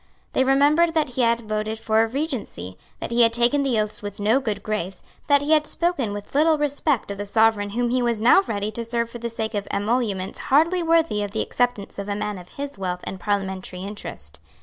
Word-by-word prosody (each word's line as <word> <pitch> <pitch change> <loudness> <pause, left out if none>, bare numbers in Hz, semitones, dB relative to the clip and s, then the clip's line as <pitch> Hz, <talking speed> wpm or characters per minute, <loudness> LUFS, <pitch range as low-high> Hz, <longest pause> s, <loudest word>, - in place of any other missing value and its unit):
They 260 - +3
remembered 295 +5 +3
that 305 -3 +2
he 250 +1 -2
had 235 0 +2
voted 215 0 -3
for 220 0 +2
a 225 - +2
Regency, 235 - -4 0.2
that - - -5
he 235 +1 +3
had 230 -1 +6
taken 240 +4 +2
the 260 -5 +1
oaths 210 0 -2
with 205 -1 -7
no 215 +6 +3
good 210 -6 -3
grace, 195 -4 -4 0.2
that 285 -1 +4
he 295 - -1
had 305 -1 +4
spoken 335 -11 0
with 205 0 -7
little 310 +2 +4
respect 290 -5 0
of 200 - -6
the 205 - -4
Sovereign 220 -1 +3
whom 240 +3 -1
he 255 0 +2
was 235 -2 0
now 240 - +6
ready 205 0 -2
to 230 +2 -4
serve 235 0 -2
for 240 - -8
the 235 0 -3
sake 220 -1 -4
of 205 -1 -3
emoluments 205 -3 -1
hardly 330 +6 +3
worthy 330 -10 +2
of 205 - -2
the 220 - 0
acceptance 245 -6 -2
of 200 +1 -5
a 200 - -1
man 210 -2 -3
of 180 - -13
his 280 -7 -7
wealth 180 -1 -3
and 190 - -6
parliamentary 190 -2 -3
interest. 80 - -8
225 Hz, 225 wpm, -23 LUFS, 205-270 Hz, 0.2 s, had